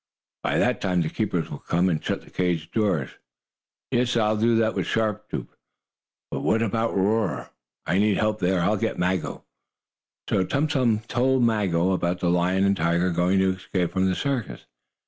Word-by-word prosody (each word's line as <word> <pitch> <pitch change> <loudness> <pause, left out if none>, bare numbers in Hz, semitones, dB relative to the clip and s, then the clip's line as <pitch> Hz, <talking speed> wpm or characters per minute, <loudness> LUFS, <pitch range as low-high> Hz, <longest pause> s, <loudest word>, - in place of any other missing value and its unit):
"By - - 0
that - - +1
time 90 -2 +1
the 80 - -3
keepers 95 -7 -2
will - - -6
come, 90 +2 +1
and 80 -4 -1
shut - - -2
the - - -18
cage 90 -2 -1
doors. 95 - 0 0.8
Yes, 120 0 +1
I'll 110 -1 +2
do 115 +2 +2
that 110 -1 +2
with - - -2
Sharp 110 -3 -1
Tooth; - - -6 0.8
but - - -2
what 115 +1 +1
about 115 0 -1
Roarer? 105 +1 0 0.3
I 90 +4 +1
need 105 -1 +3
help 110 0 0
there. 90 -1 +1
I'll 105 +5 +2
get - - -2
Maggo." 90 0 -1 0.8
So 95 - +2
Tum 140 +11 0
Tum 125 -7 +1
told 130 +2 +1
Maggo, 95 -6 +2
about 90 -1 -1
the 85 -1 +1
lion 90 +2 +2
and 100 0 +3
tiger 85 +1 +1
going 90 +3 +2
to 95 0 +3
escape 90 -2 -2
from 95 0 +2
the 95 - 0
circus. 135 -7 -3
95 Hz, 185 wpm, -24 LUFS, 90-110 Hz, 0.8 s, need